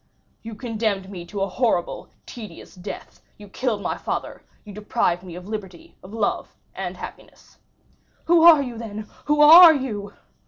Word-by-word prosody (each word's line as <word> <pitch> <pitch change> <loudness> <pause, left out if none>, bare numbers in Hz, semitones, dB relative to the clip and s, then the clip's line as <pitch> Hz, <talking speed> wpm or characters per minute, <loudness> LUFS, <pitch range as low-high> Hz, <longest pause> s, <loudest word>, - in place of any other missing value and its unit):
"You 225 -1 -9
condemned 215 -4 -3
me 175 -3 -9
to 200 +2 -6
a 195 - 0
horrible, 195 -3 -2 0.2
tedious 225 -5 -11
death; 180 -2 -10 0.2
you 205 - -13
killed 215 0 -3
my - - -3
father; - - -5 0.2
you 205 - -11
deprived 195 -4 -1
me 180 -2 -10
of 180 +1 -10
liberty, 195 -5 -8
of 185 - -13
love, 220 -2 -3 0.2
and - - -6
happiness." - - -12 0.7
"Who 335 0 +4
are 325 -4 +7
you, 240 -3 -7
then? 215 -2 -7 0.2
Who 295 0 +2
are 325 +2 +10
you?" 210 -7 -5
210 Hz, 160 wpm, -22 LUFS, 195-250 Hz, 0.7 s, are